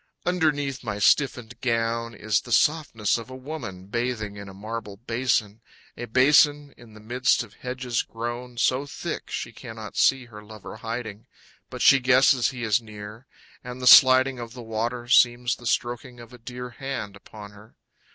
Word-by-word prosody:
Underneath 150 -7 0
my 105 -3 -4
stiffened 120 +1 +1
gown 115 -1 -1
Is 110 0 0
the 120 - -11
softness 120 -7 +1
of 115 - -10
a 130 - -8
woman 130 -10 -7
bathing 110 -1 -3
in 100 -1 -9
a - - -9
marble 105 0 -7
basin, 115 -2 -1 0.3
A 120 - -6
basin 145 +4 +3
in 115 -3 -16
the - - -12
midst 125 +4 +1
of 110 -3 -15
hedges 125 -1 -3
grown 120 +2 -6
So 130 +3 +1
thick, - - -6
she - - -4
cannot - - -10
see 135 -2 +3
her 105 -3 -12
lover 105 0 -11
hiding, 110 -1 -6 0.4
But - - -5
she 135 - +7
guesses 130 0 +4
he 125 -2 -7
is 110 +1 +2
near, 105 +2 -11 0.4
And 125 +1 -8
the 125 - -5
sliding 130 +1 +7
of 115 -1 -8
the 125 -1 -9
water 115 +2 -3
Seems 120 -1 +3
the 120 - -8
stroking 120 +1 -2
of 120 +1 -13
a 125 - -13
dear 125 +1 -8
Hand 120 -6 -6
upon 105 +1 -12
her. 105 +2 -17
120 Hz, 170 wpm, -25 LUFS, 110-130 Hz, 0.4 s, she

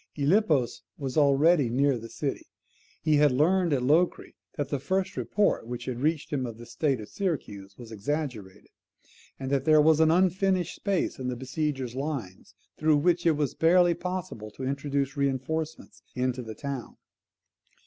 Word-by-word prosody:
Gylippus 150 - +2 0.2
was 135 -3 -4
already 145 -1 +4
near 135 +3 +2
the 115 -1 -7
city. - - -4 0.6
He 155 -1 +3
had 145 -1 +5
learned 170 +6 +2
at 135 -3 +1
Locri 160 +7 +1 0.2
that 145 -2 -2
the 140 - -1
first 190 +6 -1
report 200 - 0
which 125 0 -5
had 125 -2 -4
reached 155 0 -1
him 130 -3 -1
of 115 -2 -8
the 120 - -10
state 135 +1 -1
of 105 - -8
Syracuse 105 - -4
was 120 -2 -11
exaggerated; 110 -4 -4 0.7
and 135 0 -4
that 140 -2 +1
there 155 -1 +6
was 155 +1 +5
an 160 0 +5
unfinished 185 +1 +2
space 195 -8 -1
in 130 - -3
the 125 - -2
besiegers' 130 -1 -3
lines 135 -10 -5 0.2
through 155 -1 +4
which 170 +3 +2
it 160 -3 +3
was 145 -4 -1
barely 175 +1 +4
possible 175 - -5
to 130 - -9
introduce 140 0 -2
reinforcements 145 +3 -3
into 125 0 -1
the 110 -2 -8
town. 140 0 -6
140 Hz, 165 wpm, -27 LUFS, 125-160 Hz, 0.7 s, there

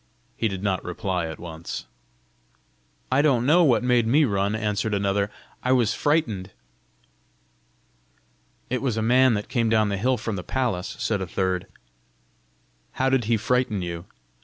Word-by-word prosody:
He 115 - 0
did 95 -2 -5
not 95 -3 0
reply 90 -1 -2
at 80 -1 -7
once. 80 -1 -7 1.3
"I 130 +2 +4
don't 130 -5 +2
know 170 +6 +5
what 130 -6 +3
made 125 -2 +3
me 145 +6 +4
run," 100 -2 0
answered 105 0 -1
another. 100 0 0 0.3
"I 130 - +2
was 120 -4 +2
frightened!" 115 - 0 2.2
"It 130 - 0
was 125 -5 -1
a 110 - 0
man 125 +1 +4
that 105 - -3
came 115 -3 0
down 110 -2 +3
the 100 - -1
hill 125 +5 +1
from 110 -2 -4
the 90 - -5
palace," 115 -6 -2
said 105 -3 -1
a 95 - -3
third. 95 +1 -1 1.3
"How 130 0 +1
did 130 -4 +2
he 115 +1 +2
frighten 115 -3 0
you?" 85 0 -5
110 Hz, 160 wpm, -24 LUFS, 95-125 Hz, 2.2 s, know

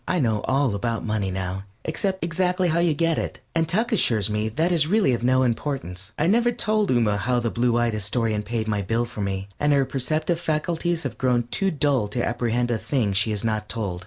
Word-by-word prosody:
I 180 - +1
know 110 -6 +1
all 135 -3 +1
about 115 +3 -2
money 105 -3 -1
now, 95 +1 -4 0.2
except 190 +4 -2
exactly 180 +1 +1
how 165 +1 +1
you 170 -3 +2
get 165 0 +1
it, - - -4
and 165 -1 +1
Tuck 220 +8 0
assures 110 - +2
me 105 +1 0
that 160 +10 0
is 160 -4 +3
really 200 - +3
of 120 - -1
no 130 +1 +3
importance. 115 - -3
I 150 - +1
never 235 +6 +3
told 215 -3 +1
Ooma 115 -5 +2
how 120 +5 +1
the 115 -1 -1
blue 120 0 +1
eyed 120 -1 +1
Astorian 110 +1 -1
paid 110 +1 -3
my 105 -2 0
bill 115 +5 0
for 115 -3 -7
me, 95 -1 -3
and 150 0 +2
her 140 -1 +3
perceptive 155 +6 -1
faculties 165 +1 -1
have 135 - -5
grown 125 -2 +2
too 195 - 0
dull 140 - +1
to 120 +4 -2
apprehend 120 0 0
a 115 - 0
thing 110 -2 0
she 105 +3 +2
is 105 0 -1
not 110 -1 -2
told. 100 -7 -3
120 Hz, 220 wpm, -24 LUFS, 110-160 Hz, 0.2 s, is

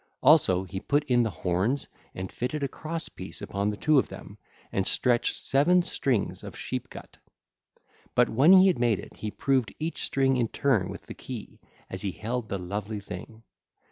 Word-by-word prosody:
Also 130 - +5
he 95 0 -5
put 145 +8 +1
in 125 -4 +3
the 115 - +1
horns 95 - -1 0.3
and 95 0 -5
fitted 135 +4 -3
a - - +1
cross 160 +4 -5
piece 95 - -8
upon 100 +1 -2
the 105 - -3
two 155 -2 +4
of - - 0
them, - - -10 0.4
and 95 - 0
stretched 120 -2 +2
seven 175 +6 +3
strings 130 -9 -1
of - - -8
sheep - - -4
gut. - - -11 1.0
But - - +5
when 135 +10 +5
he 190 0 +9
had 185 -9 +3
made 120 -4 +3
it - - -11
he 110 - -4
proved 130 +1 0
each 160 +2 -3
string 135 -1 +2
in 120 -2 +1
turn 110 -8 +1
with - - -8
the - - -8
key, - - -8 0.3
as 95 - -3
he 95 -2 -2
held 115 +2 -4
the 100 - -1
lovely 100 +3 -4
thing. 105 +3 -9
120 Hz, 190 wpm, -27 LUFS, 100-140 Hz, 1.0 s, he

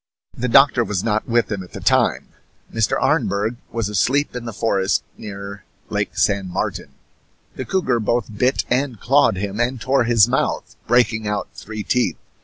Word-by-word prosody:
The 125 - -2
doctor 135 0 +5
was 105 -4 -2
not 110 -1 0
with 120 -1 +1
him 100 -2 -2
at 90 - -12
the - - -6
time. - - +1 0.4
Mr. 115 -3 +1
Arneberg 105 +4 0
was 115 -2 -2
asleep 125 +8 +1
in 120 -1 -5
the 115 - -4
forest 100 -3 0
near 100 -1 -8 0.3
Lake - - -2
San 100 -2 +1
Martin. - - -4 0.6
The - - -5
cougar 155 -11 0
both 110 -1 -1
bit 125 +5 +1
and 125 -3 -1
clawed 130 -5 +3
him, 100 +2 -4
and 125 +1 0
tore 130 0 +1
his 115 -2 +5
mouth, 130 +2 -1
breaking 115 -2 +2
out 105 -1 -2
three 110 0 -7
teeth. 125 +4 0
115 Hz, 170 wpm, -21 LUFS, 105-125 Hz, 0.6 s, doctor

